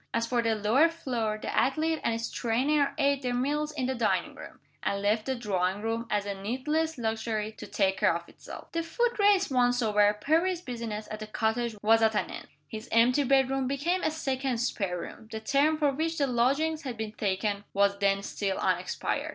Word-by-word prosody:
As 230 0 +1
for 240 0 +1
the 225 -1 +1
lower 225 +10 +4
floor, 240 -10 -2
the - - -4
athlete 310 +4 +1
and 230 - +1
his 230 0 -3
trainer 275 +5 +1
ate 280 -2 +2
their 250 -2 -1
meals 295 +4 0
in 280 -4 -3
the 260 - 0
dining 235 -3 0
room; - - -11 0.2
and 200 - -1
left 210 +3 0
the 265 - 0
drawing 200 -3 -1
room, 230 +1 -2
as 205 -1 0
a 200 - -2
needless 270 +10 -2
luxury, 220 -2 -2
to - - -10
take 190 -2 0
care - - +3
of 170 0 -6
itself. - - -11
The 335 - -1
Foot 475 +8 -1
Race 400 -5 +4
once 245 -1 +3
over, 210 -3 +4
Perry's 330 - +1
business 230 -6 -5
at 215 - -5
the 215 - -6
cottage 220 +2 -1
was 225 +1 +5
at 220 -1 +3
an - - -1
end. - - -8 0.2
His 220 +2 -8
empty 245 +5 +4
bedroom 270 0 +2
became 315 +7 0
a - - +1
second 270 -5 -2
spare 200 -6 -1
room. 220 - -9
The 220 - -4
term 280 +7 +2
for 295 -2 +2
which 320 +4 -2
the 285 - +2
lodgings 275 +6 +1
had 255 -6 -5
been 220 -1 -4
taken 200 0 -1
was 200 0 +2
then 200 0 +2
still 195 -1 -2
unexpired. 185 -1 -1
240 Hz, 205 wpm, -28 LUFS, 215-280 Hz, 0.2 s, was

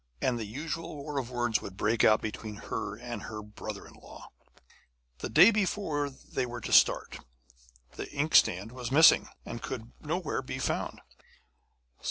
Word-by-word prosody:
and 120 -2 0
the 110 - -3
usual 155 +9 -5
war 145 0 -4
of 125 -2 -5
words 120 -3 0
would 95 -1 -9
break 110 +3 +1
out 110 - +5
between 110 0 -5
her 100 0 -4
and 120 -2 -6
her 105 -1 -7
brother 105 0 -8
in - - -14
law. - - -13 0.9
The - - -4
day 205 - +8
before 190 -8 0
they 135 -1 -5
were 120 0 -6
to - - -3
start, - - +4 0.7
the - - -7
inkstand 115 - +3
was 125 -1 -6
missing, 160 +4 +7 0.2
and 115 - -6
could 120 -2 -6
nowhere 160 +1 -2
be - - -6
found. - - -2
120 Hz, 160 wpm, -29 LUFS, 110-145 Hz, 0.9 s, day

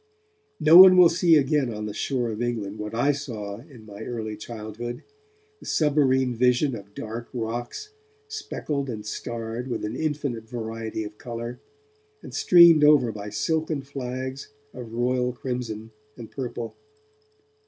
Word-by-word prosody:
No 155 +2 +7
one 185 0 +10
will 180 -2 +8
see 170 0 +4
again 140 -3 +2
on 105 -1 -5
the 105 - -5
shore 120 +2 -1
of 110 +1 -5
England 110 -4 -3
what 105 +1 -5
I 140 +5 +3
saw 110 -8 -6
in 120 -2 -15
my 105 0 -11
early 110 -2 -5
childhood, 115 +2 -7 0.6
the - - -12
submarine 135 -4 +2
vision 125 +3 +2
of 100 -1 -12
dark 115 +2 -6
rocks, 120 - -4 0.4
speckled 275 - -4
and 105 -3 -6
starred 115 +2 -5
with 120 - -3
an 105 +3 -4
infinite 140 -7 -3
variety 115 -2 -4
of 105 0 -10
colour, 120 0 -6 0.6
and - - -10
streamed 170 -4 +7
over 145 -6 +5
by 105 -1 -7
silken 155 +7 -1
flags 130 0 -5 0.3
of 120 -3 -9
royal 125 +1 0
crimson 120 -3 -5 0.3
and 115 -2 -10
purple. 120 -3 -5
120 Hz, 145 wpm, -25 LUFS, 110-140 Hz, 0.6 s, one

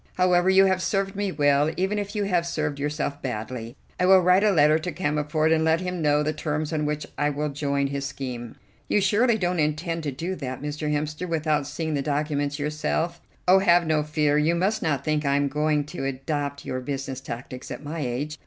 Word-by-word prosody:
"However, 180 0 +3
you 190 0 +6
have 190 -1 +2
served 195 +1 -1
me 200 -1 -1
well, 145 0 +3
even 190 +3 0
if 205 +1 -5
you 210 - 0
have 175 -4 +1
served 150 -4 -2
yourself 145 0 -2
badly. 120 0 -5 0.2
I 180 - +3
will 190 0 +8
write 180 +2 +4
a 215 - +5
letter 155 -4 +4
to 175 +3 -4
Cammerford 150 -1 0
and 160 0 +3
let 160 +1 +3
him 180 -1 -3
know 150 -1 +3
the 155 +1 0
terms 155 0 -3
on 150 -1 0
which 150 0 -2
I 145 0 +2
will 150 +1 -2
join 140 -1 -1
his 140 0 -3
scheme." 125 -4 -6 0.3
"You - - +2
surely 220 +4 +3
don't 180 -3 0
intend 160 +3 -1
to 150 -2 -3
do 165 +8 -4
that, 130 -2 -5
Mr. 150 +1 -3
Hemster, 150 +4 -2
without 155 -3 0
seeing 160 +1 -3
the 140 - 0
documents 145 0 -1
yourself?" 155 +3 -2 0.3
"Oh, 190 +1 +7
have 175 -2 +4
no 155 -1 +2
fear; 150 -1 +1
you 160 +3 +2
must 195 +5 0
not 150 -4 -1
think 155 -1 +1
I 140 -1 +2
am 145 0 +2
going 150 +1 +1
to 135 - -4
adopt 140 +1 -3
your 130 - -3
business 135 0 -4
tactics 125 0 -7
at - - -7
my 155 +3 -5
age. 145 +3 -3
150 Hz, 215 wpm, -25 LUFS, 145-175 Hz, 0.3 s, will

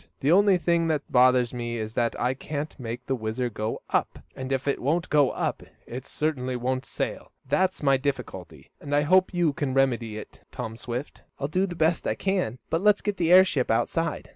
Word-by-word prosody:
The 140 - +2
only 195 +1 +5
thing 170 -1 +1
that 155 -2 -2
bothers 125 -1 +4
me 120 -1 -3
is 110 -1 -4
that 115 0 0
I 125 +2 +1
can't 145 +3 -5
make 120 0 -6
the 135 - -1
WHIZZER 120 +1 -2
go 110 +1 -4
up, - - 0 0.2
and 130 0 -6
if 135 +1 -1
it 140 - 0
won't 160 +6 0
go 145 -3 +5
up, - - -2 0.2
it 125 +2 -7
certainly 130 -5 -2
won't 130 +2 -2
sail. - - -4 0.2
That's 185 +5 +1
my 135 -1 +4
difficulty, 140 +1 -5
and 145 0 -2
I 145 - +4
hope 185 +5 +4
you 175 -5 +1
can 135 -2 -2
remedy 120 -5 +1
it, 110 - -10
Tom 115 -3 -5
Swift." 120 +3 -6 0.2
"I'll 140 - -1
do 185 +6 0
the 175 - -6
best 160 +1 +1
I - - 0
can. 185 - -1
But 165 - +1
let's 210 0 +4
get 205 -1 -1
the 170 -1 +1
airship 180 -8 +5
outside." 165 +8 0
135 Hz, 205 wpm, -26 LUFS, 125-165 Hz, 0.2 s, only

